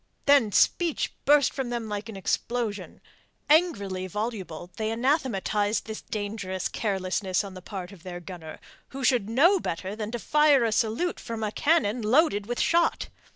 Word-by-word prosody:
Then 280 -7 +5
speech 335 - +2
burst 290 -1 +5
from 265 -3 -3
them 235 -2 -3
like 210 +1 -5
an 210 - -7
explosion. 225 +2 -3 0.5
Angrily 200 - +2
voluble 190 -4 -5
they 220 0 -1
anathematized 225 -4 0
this 220 -1 -6
dangerous 200 -3 -4
carelessness 190 -2 -1
on 195 -1 -8
the 185 - -9
part 185 0 -7
of 195 -4 -14
their 175 0 -7
gunner, 175 -3 -9 0.3
who 270 0 -7
should 245 -5 +2
know 335 - +4
better 190 - -4
than 215 -1 -4
to 240 - -3
fire 295 +1 +4
a 225 - +1
salute 225 +11 0
from 225 -2 -5
a 210 - -1
cannon 245 -6 +1
loaded 215 -2 +2
with 240 0 -3
shot. 340 0 +2
220 Hz, 160 wpm, -26 LUFS, 195-255 Hz, 0.5 s, Then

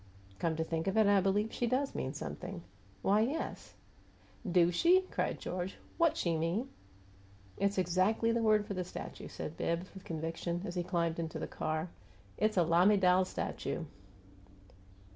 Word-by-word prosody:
"Come 165 -1 0
to 160 - 0
think 165 +2 -2
of 195 +3 +1
it, 220 - +6
I 200 -1 +5
believe 205 +3 +1
she 240 - 0
does 265 +3 0
mean 130 - -3
something. 75 +3 -6 0.4
Why, 205 +2 +4
yes 275 +8 -3 0.3
" 185 - -11
"Do 175 -1 +5
she?" 345 - +5
cried - - -1
George. 180 +1 -4 0.2
"WHAT 335 -2 +4
she 170 -2 +1
mean?" 170 +11 -1 0.9
"It's 200 0 +1
exactly 185 +6 +2
the 235 0 +1
word 215 -2 +4
for 200 - -4
the 185 -1 -2
statue," 180 - -7
said 155 - -6
Bibbs, 170 +2 -2
with 190 - -10
conviction, 165 +2 -3
as 175 - -4
he 175 - -1
climbed 170 -2 -1
into 165 -1 -3
the - - -3
car. 155 +2 -2 0.5
"It's 215 -1 +2
a 175 - +6
lamiDAL 180 +2 +5
statue." - - -3
185 Hz, 165 wpm, -33 LUFS, 170-210 Hz, 0.9 s, it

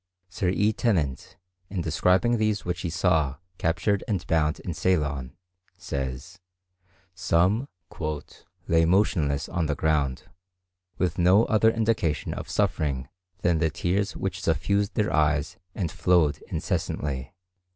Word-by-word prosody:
Sir 95 0 -1
E. 105 +4 +2
Tennent, 85 - -1 0.3
in 95 -2 -2
describing 90 +8 +2
these 110 -1 0
which 90 0 -2
he 85 - -2
saw 80 -5 +1 0.2
captured 85 +5 +1
and 100 -5 -1
bound 80 -2 +1
in 90 - -4
Ceylon, 75 -7 0 0.4
says, 70 +7 -5 0.7
some 95 +7 +2 1.0
"lay 80 0 +4
motionless 80 -6 +2
on 85 -2 -1
the 75 - 0
ground, 70 -4 0 0.7
with 90 0 -1
no 95 +5 +5
other 110 0 +4
indication 110 -9 0
of - - -7
suffering 65 -4 0 0.3
than 85 -2 +3
the 80 -1 +2
tears 95 +6 -1
which 95 -1 -3
suffused 95 +6 0
their 105 0 +1
eyes 75 +1 +1 0.2
and 90 -6 -2
flowed 80 -5 +2
incessantly." 70 +2 -3
85 Hz, 125 wpm, -26 LUFS, 75-95 Hz, 1.0 s, no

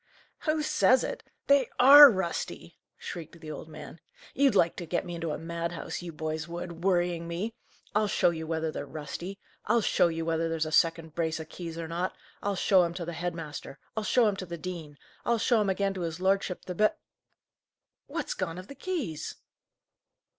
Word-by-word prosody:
"Who 310 -1 +1
says 260 -3 +4
it! - - -4 0.2
They 280 -3 +4
are 285 +3 +11
rusty!" 190 -6 -3 0.2
shrieked 170 -1 -8
the 155 -1 -8
old 155 - -8
man. 155 +1 -10 0.3
"You'd 275 -4 +3
like 170 -3 +4
to 175 - -6
get 175 - -1
me 175 - -6
into 165 -1 -3
a 150 - -2
madhouse, 170 +2 -4
you 175 -1 -6
boys 155 0 -4
would, 170 0 -7
worrying 175 -3 +1
me! 180 +7 -3 0.4
I'll 210 0 +2
show 175 - +3
you 160 -1 -5
whether 160 -1 -1
they're 145 - -5
rusty! 155 +7 -6 0.3
I'll 230 +2 +4
show 180 - +3
you 165 -1 -3
whether 165 0 0
there's 165 -1 0
a 155 - -5
second 165 -1 +2
brace 160 -1 -1
o' 160 - -5
keys 165 0 -7
or 165 -1 -4
not. 175 +3 -2 0.3
I'll 205 0 -1
show 190 0 +4
'em 170 -1 -1
to 175 -2 -4
the 170 - -5
head 175 +1 -3
master! 150 -4 -7 0.2
I'll 220 - 0
show 240 +2 +4
'em 205 - +1
to 185 - -5
the 170 0 -5
dean! 160 -4 -7 0.3
I'll 235 - +2
show 230 +1 +3
'em 205 -2 +1
again 195 +1 0
to 185 - -5
his 165 0 -3
lordship 190 -1 0
the 180 - -4
bi 215 +4 +3 1.1
What's - - -3
gone 165 +1 -3
of 185 +2 -9
the - - -7
keys?" 280 - -4
170 Hz, 200 wpm, -29 LUFS, 165-195 Hz, 1.1 s, are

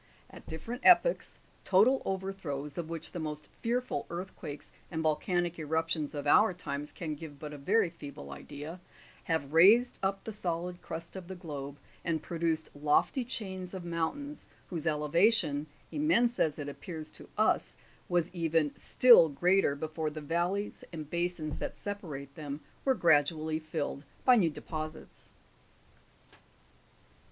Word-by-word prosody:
At - - -13
different 230 - -5
epochs, - - +5 0.3
total 220 +8 +5
overthrows, 185 -7 -3
of 165 -2 -4
which 165 -1 -2
the 175 - -5
most 150 -1 -5
fearful 240 - -1
earthquakes 170 -4 -6 0.2
and 160 -2 -2
volcanic 175 +2 0
eruptions 160 -1 -1
of 145 - -4
our 190 +6 +5
times 145 -4 -5
can 160 -3 -4
give 150 -1 -9
but 150 +1 -7
a - - -7
very 190 +4 +2
feeble 140 - -9
idea, 145 - -8 0.5
have 160 -4 -1
raised 210 +9 +6
up 195 0 -1
the 220 - -6
solid 175 -2 -3
crust 165 +3 -7
of 185 -2 -7
the 190 - -6
globe, 145 -5 -6 0.3
and 165 -2 -1
produced 165 -2 -1
lofty 150 - +2
chains 190 -6 -5
of 180 -2 -6
mountains, 175 - -3 0.2
whose 170 -2 -3
elevation, 155 0 +3 0.2
immense 245 -6 +2
as 150 -2 +2
it 145 -2 -5
appears 155 +2 -6
to - - -12
us, - - +2 0.3
was 175 -1 +1
even 165 -3 +1
still 235 -10 +7
greater 175 +1 +3
before 155 +1 -3
the 155 +1 -6
val 170 +5 0
leys 205 +1 -4
and 155 -3 -7
basins 170 -3 -2
that - - -4
separate 155 -10 -6
them 145 0 -6 0.2
were 265 -1 +4
gradually 155 - +3
filled 155 -3 -3 0.2
by 255 - +8
new 185 -8 +4
deposits. 155 0 -7
165 Hz, 145 wpm, -31 LUFS, 150-190 Hz, 0.5 s, by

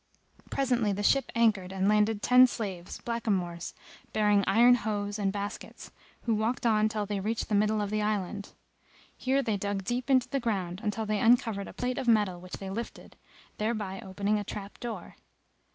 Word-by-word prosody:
Presently 245 -6 +1
the 205 +1 -3
ship 275 +5 +2
anchored 210 -5 +2
and 190 0 0
landed 210 0 +2
ten 250 +1 +7
slaves, 190 -7 -5
blackamoors, 190 -8 -2 0.4
bearing 210 -2 +3
iron 235 +5 +6
hoes 210 -3 -1
and 195 -1 +1
baskets, 205 +1 -6 0.3
who 230 - +1
walked 220 +3 -1
on 215 -1 +3
till 215 -1 -2
they 205 0 -2
reached 220 +5 -2
the - - -1
middle 210 +1 +3
of 205 -1 -3
the 215 0 0
island. 205 -1 -2 0.6
Here 270 +1 +1
they 220 -5 0
dug 200 0 -2
deep 245 +6 -2
into 260 -2 +4
the 275 - -1
ground, 195 -6 -2
until 215 +1 -1
they 210 -1 0
uncovered 225 -3 +3
a - - -10
plate 250 0 -2
of 250 - -4
metal 205 -6 +3
which 180 0 -12
they 195 -1 -5
lifted, 230 +4 -7 0.4
thereby 210 -3 -2
opening 200 +2 -1
a - - -3
trap 205 0 -8
door. 225 -7 -6
210 Hz, 180 wpm, -29 LUFS, 200-230 Hz, 0.6 s, ten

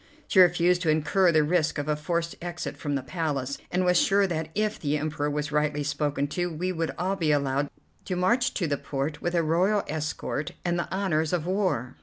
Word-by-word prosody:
She 190 - +3
refused 175 0 +5
to 165 - 0
incur 170 +4 +3
the 155 -2 +4
risk 160 0 +1
of 145 0 -3
a 150 - +1
forced 170 +2 -2
exit 175 0 -5
from 145 -2 -3
the 135 - -2
Palace, 140 -3 -2
and 180 +1 0
was 180 -1 +4
sure 200 0 +3
that 160 -4 -2
if 215 +1 0
the 150 0 0
Emperor 150 -1 -2
was 150 0 -2
rightly 150 0 +1
spoken 145 -1 -1
to 175 +3 -2
we 180 +4 -2
would 165 -2 -2
all 185 +3 0
be 165 -5 +1
allowed 140 -1 +1 0.4
to 185 - -2
march 235 +8 +2
to 180 - 0
the 145 -3 -1
port 145 +2 -3
with 175 0 -1
a 170 - +3
royal 185 +6 +2
escort 150 -1 -3
and 175 0 +1
the 170 - -4
honours 170 -5 0
of 170 -3 0
war. 180 - -1
160 Hz, 215 wpm, -27 LUFS, 150-180 Hz, 0.4 s, refused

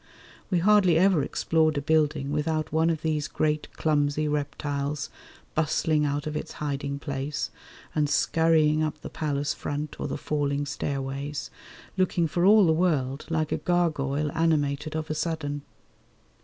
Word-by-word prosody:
We 180 - +2
hardly 185 -2 +5
ever 185 -3 +4
explored 155 +2 +1
a - - 0
building 150 -2 +1
without 155 +1 -1
one 160 +1 +2
of 160 -2 -2
these 155 -2 0
great 150 0 -1
clumsy 150 -1 +1
reptiles 145 -1 -2 0.4
bustling 155 0 +1
out 145 0 -1
of 155 0 -4
its 150 - -4
hiding 140 -1 -3
place 140 0 -3 0.4
and 150 -2 +1
scurrying 155 -1 +3
up 155 -1 -2
the - - -8
palace 145 -3 -1
front 145 +1 -5
or - - -2
the - - -3
falling 145 -1 -1
stairways, 140 0 -4 0.5
looking 180 -2 +2
for 175 +3 0
all 210 -1 +7
the 160 - +4
world 150 -6 0
like 155 -2 0
a - - +1
gargoyle 150 -4 0
animated 155 -2 0
of 155 0 -3
a - - +1
sudden. 155 -2 -2
150 Hz, 150 wpm, -26 LUFS, 145-160 Hz, 0.5 s, all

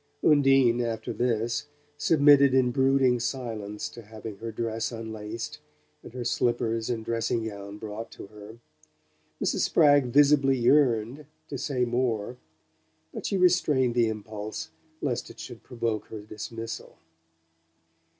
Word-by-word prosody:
Undine, 135 -5 +4
after 115 -1 -3
this, 120 +3 -1 0.3
submitted 145 -3 +5
in 125 -2 +3
brooding 130 -1 +3
silence 115 -5 -4
to 120 - -11
having 110 0 -9
her 115 +1 -6
dress 115 +1 -3
unlaced, 110 -1 -6 0.4
and 120 - -13
her 125 - -3
slippers 115 -1 0
and 115 -2 -3
dressing 115 0 -1
gown 100 -1 -7
brought 110 +1 -7
to - - -10
her. 105 +2 -12 0.8
Mrs. - - 0
Spragg 145 -4 +4
visibly 140 0 +4
yearned 125 +1 +2 0.2
to 140 - -4
say 130 -2 0
more, 120 -1 -1 0.8
but - - -4
she 200 - 0
restrained 155 -9 +3
the 120 -1 +3
impulse 110 +6 -6 0.3
lest 125 -5 -2
it - - -13
should 120 - -9
provoke 115 -4 -3
her 110 - -8
dismissal. 110 +2 -7
120 Hz, 130 wpm, -27 LUFS, 110-135 Hz, 0.8 s, submitted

